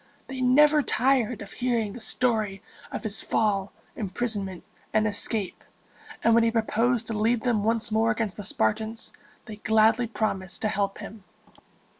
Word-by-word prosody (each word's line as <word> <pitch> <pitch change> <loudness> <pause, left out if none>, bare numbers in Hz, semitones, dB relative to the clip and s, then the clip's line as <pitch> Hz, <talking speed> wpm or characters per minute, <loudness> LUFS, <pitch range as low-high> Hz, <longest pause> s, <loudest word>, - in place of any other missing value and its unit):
They 265 -1 -6
never 295 +4 +5
tired 250 -5 +1
of 200 - -12
hearing 235 -5 -1
the 245 - -9
story 215 -4 0 0.3
of - - -5
his 220 -1 -2
fall, 205 -3 0 0.2
imprisonment, 200 -3 -3 0.3
and 215 0 +2
escape; 205 -1 -2 0.6
and 230 - +5
when 230 0 +5
he 230 - +4
proposed 230 +1 +1
to 225 - -4
lead 220 +2 +1
them 235 -5 +1
once 225 +1 0
more 220 +1 +2
against 215 -2 -1
the 205 - -7
Spartans, 220 - -1 0.3
they 215 -3 -8
gladly 220 +2 +3
promised 195 -5 -3
to 215 - +2
help 200 -1 -1
him. 215 -2 -9
220 Hz, 155 wpm, -26 LUFS, 210-235 Hz, 0.6 s, never